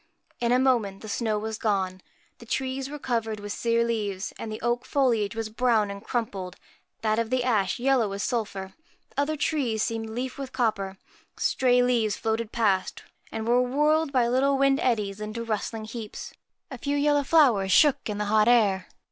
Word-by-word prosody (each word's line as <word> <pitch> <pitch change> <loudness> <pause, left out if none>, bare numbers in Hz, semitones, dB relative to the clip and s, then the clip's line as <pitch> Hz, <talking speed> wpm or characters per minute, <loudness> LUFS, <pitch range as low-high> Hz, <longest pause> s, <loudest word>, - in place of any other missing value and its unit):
In 235 0 +1
a 250 - +5
moment 235 -7 +1
the - - -7
snow 215 0 -1
was 220 +1 -4
gone. 190 -3 -1 0.4
The 235 - -13
trees 265 +2 -2
were 295 - -6
covered 230 -5 -2
with 205 0 -5
sere 235 0 +1
leaves; 210 -4 -2
the 215 -1 -5
oak 240 +1 0
foliage 235 -7 +1
was 225 -1 -3
brown 220 -3 +1
and 200 +1 -8
crumpled, 200 -7 -3 0.5
that 215 0 +2
of 230 -1 -1
the 255 0 +1
ash 210 -6 +1
yellow 250 -4 +2
as 200 - -3
sulphur; 200 -5 -3 0.4
other 285 +2 0
trees 260 -8 0
seemed 225 -1 -3
leafed 250 +4 -4
with 270 -2 -6
copper. 200 -6 -1 0.4
Stray 250 -1 +3
leaves 235 -4 +1
floated 225 0 -2
past 200 -5 0 0.3
and 220 0 -4
were 245 +1 +4
whirled 300 +4 +2
by 250 -4 +3
little 270 +3 +2
wind 275 0 +3
eddies 210 -4 0
into 215 +2 -4
rustling 220 0 -3
heaps. 220 -1 -7 0.4
A 260 - -7
few 285 +3 -1
yellow 290 0 +3
flowers 250 -12 +4
shook 290 +1 +4
in 210 - -3
the 210 - -1
hot 215 +1 +3
air. 205 -6 +3
230 Hz, 180 wpm, -26 LUFS, 210-255 Hz, 0.5 s, a